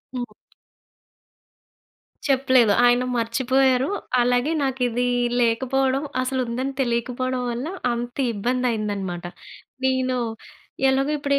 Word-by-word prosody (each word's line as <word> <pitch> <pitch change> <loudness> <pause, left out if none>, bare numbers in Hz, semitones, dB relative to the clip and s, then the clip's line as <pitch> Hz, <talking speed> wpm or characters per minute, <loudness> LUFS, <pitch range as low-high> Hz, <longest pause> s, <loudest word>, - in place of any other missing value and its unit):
హ్మ్. 245 -1 -5 1.9
చెప్పలేదు. 260 -5 +4
ఆయన 245 +1 +4
మర్చిపోయారు. 260 +4 +2 0.3
అలాగే 245 +4 +2
నాకు 265 -1 -2
ఇదీ 245 +1 0 0.3
లేకపోవడం, 260 +3 +1 0.2
అసలు 260 +1 -1
ఉందని 260 +4 -3
తెలియకపోవడం 250 +1 -1
వల్ల 245 +6 -4 0.2
అంత 240 +1 -4 0.2
ఇబ్బంది 245 +5 -1
అయిందన్నమాట. 200 -5 -3 0.6
నేను, 260 -1 +1 0.7
ఎలాగో 270 +2 +1
ఇప్పుడు 280 -1 -1
250 Hz, 95 wpm, -23 LUFS, 235-265 Hz, 1.9 s, చెప్పలేదు